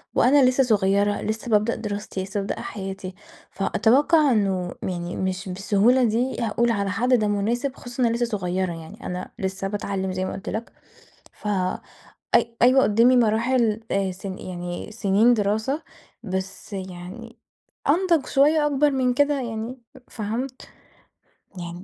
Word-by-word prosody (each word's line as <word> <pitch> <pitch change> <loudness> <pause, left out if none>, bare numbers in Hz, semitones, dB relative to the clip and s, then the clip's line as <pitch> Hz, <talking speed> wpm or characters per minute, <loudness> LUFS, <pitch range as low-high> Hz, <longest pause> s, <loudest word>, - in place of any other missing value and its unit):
وأنا 275 +2 +5
لسه 260 +1 +3
صغيرة 205 -3 +2
لسه 220 +2 -3
بابدأ 215 +2 +3
دراستي، 205 -3 -4
لسه 195 +2 -3
بابدأ 195 - -3
حياتي، 190 -2 -6 0.4
فأتوقع 280 +9 +3
إنه 190 -5 +1
يعني 175 -1 -3
مش 190 +1 -2
بالسهولة 205 +7 +3
دي 240 +3 0
هاقول 235 +1 +1
على 200 -3 -1
حد 245 +6 +1
ده 215 -4 +3
مناسب، 235 +7 -1
خصوصًا 245 +1 -4
إن - - +5
أنا 230 - 0
لسه 240 0 +1
صغيرة 180 -1 -1
يعني 165 +8 -10
أنا 180 0 -5
لسه 190 -1 -2
باتعلم 195 -2 -3
زي 185 0 -2
ما - - -4
قُلت 190 - -6
لَك 220 +2 -4 0.6
ف 210 - -7 0.9
أي 235 -1 +3
أيوة 260 +2 +6
قدامي 235 +4 +4
مراحل 230 0 +2
آآ 195 -1 +1
سن 190 +1 -7
يعني 175 -1 -6
سنين 220 +2 +3
دراسة، 220 +8 0 0.4
بس 190 +1 -5
يعني 185 -2 -8 0.5
أنضج 335 -2 +3
شوية 295 +2 +3
أكبر 295 0 +3
من 255 -2 +1
كده 290 +2 +3
يعني 235 +1 -5 0.3
فهمت؟ 240 +4 -5 0.9
يعني 175 +1 -7
215 Hz, 145 wpm, -24 LUFS, 190-245 Hz, 0.9 s, أيوة